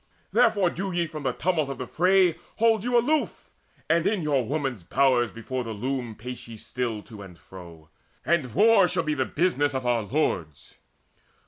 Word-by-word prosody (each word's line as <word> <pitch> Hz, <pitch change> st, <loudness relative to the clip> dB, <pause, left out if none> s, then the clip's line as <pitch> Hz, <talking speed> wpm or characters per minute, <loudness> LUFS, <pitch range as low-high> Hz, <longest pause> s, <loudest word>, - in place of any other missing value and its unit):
Therefore 190 Hz, -4 st, +3 dB
do 195 Hz, +2 st, -4 dB
ye 175 Hz, -1 st, 0 dB
from 155 Hz, -5 st, -3 dB
tumult 160 Hz, -4 st, 0 dB
of 135 Hz, -, -5 dB
the 130 Hz, -, -5 dB
fray 180 Hz, +5 st, +3 dB, 0.2 s
Hold 225 Hz, -2 st, +2 dB
you 245 Hz, 0 st, +2 dB
aloof, 295 Hz, +6 st, 0 dB, 0.4 s
and 165 Hz, +2 st, +2 dB
in 200 Hz, -4 st, 0 dB
your 140 Hz, -4 st, +1 dB
women's 135 Hz, -, -3 dB
bowers 130 Hz, +2 st, +2 dB
Before 120 Hz, +4 st, -5 dB
the 115 Hz, -1 st, -5 dB
loom 125 Hz, 0 st, -3 dB
still 125 Hz, +3 st, -6 dB
pace 125 Hz, -, -12 dB
ye 115 Hz, 0 st, -4 dB
to 110 Hz, -3 st, -12 dB
and 90 Hz, -3 st, -12 dB
fro; 85 Hz, -3 st, -13 dB, 0.4 s
And 155 Hz, -8 st, 0 dB
war 210 Hz, -2 st, +6 dB
shall 175 Hz, -1 st, 0 dB
be 155 Hz, -1 st, -1 dB
the 130 Hz, -3 st, 0 dB
business 145 Hz, -4 st, 0 dB
of 130 Hz, -1 st, -3 dB
our 120 Hz, -1 st, +2 dB
lords. 100 Hz, -, -3 dB
135 Hz, 180 wpm, -25 LUFS, 115-175 Hz, 0.4 s, war